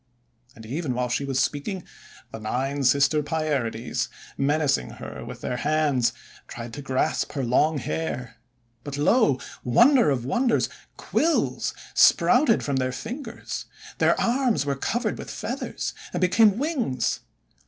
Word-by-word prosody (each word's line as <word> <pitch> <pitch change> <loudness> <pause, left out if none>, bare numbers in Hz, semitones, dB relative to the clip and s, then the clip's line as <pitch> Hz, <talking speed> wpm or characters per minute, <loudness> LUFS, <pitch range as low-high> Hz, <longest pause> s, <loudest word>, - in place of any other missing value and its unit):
And 110 - -12
even 135 +2 -3
while 125 0 -1
she 130 +3 -1
was 135 -1 -1
speaking, 150 +8 -1 0.5
the 110 - -7
Nine 135 +6 -2
Sister 140 +4 +4
Pierides, 145 -7 -2 0.3
menacing 140 - +1
her - - -8
with - - -9
their 125 - -2
hands, 145 -4 +2 0.4
tried 115 -1 -8
to 145 - -6
grasp 130 -1 -1
her 140 -2 -2
long 145 +6 +2
hair. 125 -6 -4 0.5
But, 145 -1 -5
lo, 145 - +3 0.2
wonder 235 - +5
of 125 -4 0
wonders! 240 - +1 0.3
quills 330 +1 0 0.2
sprouted 235 -7 +5
from 140 -2 -1
their 130 0 0
fingers; 230 - -6 0.3
their - - +3
arms 240 - +1
were 140 -1 0
covered 235 - -2
with - - -7
feathers, - - -4 0.2
and - - -1
became 205 +3 +5
wings 240 - -1
145 Hz, 135 wpm, -25 LUFS, 125-195 Hz, 0.5 s, wonder